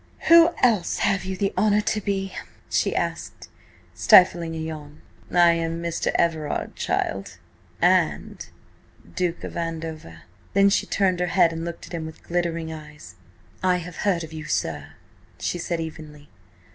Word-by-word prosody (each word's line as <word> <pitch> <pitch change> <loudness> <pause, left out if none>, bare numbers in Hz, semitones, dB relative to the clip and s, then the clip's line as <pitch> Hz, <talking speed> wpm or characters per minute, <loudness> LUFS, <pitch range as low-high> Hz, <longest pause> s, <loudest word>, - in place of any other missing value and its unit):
"Who 335 0 +9
else 215 -8 +3
have 195 -1 +1
you 190 0 -4
the 195 +1 -1
honour 210 +2 +3
to 215 0 -1
be?" 195 -1 -2 0.4
she - - +1
asked, - - -4 0.4
stifling 170 -3 +5
a - - -4
yawn. 155 -2 -7 0.3
"I 175 -1 +6
am 165 0 -2
Mr. 170 -1 -3
Everard, 160 -3 -1
child, 95 0 -2 0.5
and - - +2 0.7
Duke 175 -2 -1
of - - -7
Andover." 160 - -5 0.3
Then 200 0 +5
she - - +1
turned 185 -3 +1
her 180 - 0
head 170 -1 +3
and 165 0 -5
looked 170 0 -6
at - - -13
him 160 -2 -4
with 160 - -12
glittering 170 -2 -2
eyes. 150 - -11 0.5
"I 185 -1 +2
have 180 -1 -8
heard 185 -5 0
of 160 0 -9
you, 155 -1 -7
sir," - - -3 0.5
she 175 - -2
said, 170 0 -2
evenly. 155 -2 -8
170 Hz, 155 wpm, -24 LUFS, 160-185 Hz, 0.7 s, Who